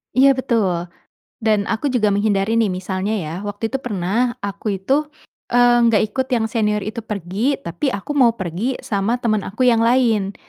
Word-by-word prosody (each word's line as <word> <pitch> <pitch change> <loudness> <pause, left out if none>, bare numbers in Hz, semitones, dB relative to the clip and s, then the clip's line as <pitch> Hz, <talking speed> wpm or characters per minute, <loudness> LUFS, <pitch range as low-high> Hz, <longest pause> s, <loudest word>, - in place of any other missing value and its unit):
Iya 270 +1 +6
betul, 195 -10 -1 0.5
dan 215 -2 +1
aku 230 +6 -1
juga 235 -6 +2
menghindari 205 +2 +1
nih. 225 - +3
Misalnya 190 +2 -2
ya, 165 -6 -4
waktu 205 +2 -3
itu 270 - -1
pernah 235 +1 -1
aku 200 +1 -3
itu, 270 +11 0 0.5
eee, 240 -1 +5
nggak 225 -2 +4
ikut 260 +3 -1
yang 225 -2 +1
senior 210 -3 0
itu 220 +3 -5
pergi 210 - -2
tapi 170 - -3
aku 200 +8 -6
mau 235 -3 +5
pergi 195 +6 -3
sama 220 +4 -1
temen 215 -4 0
aku 220 +7 -3
yang 230 - +3
lain. 230 -4 +2
220 Hz, 170 wpm, -20 LUFS, 195-240 Hz, 0.5 s, Iya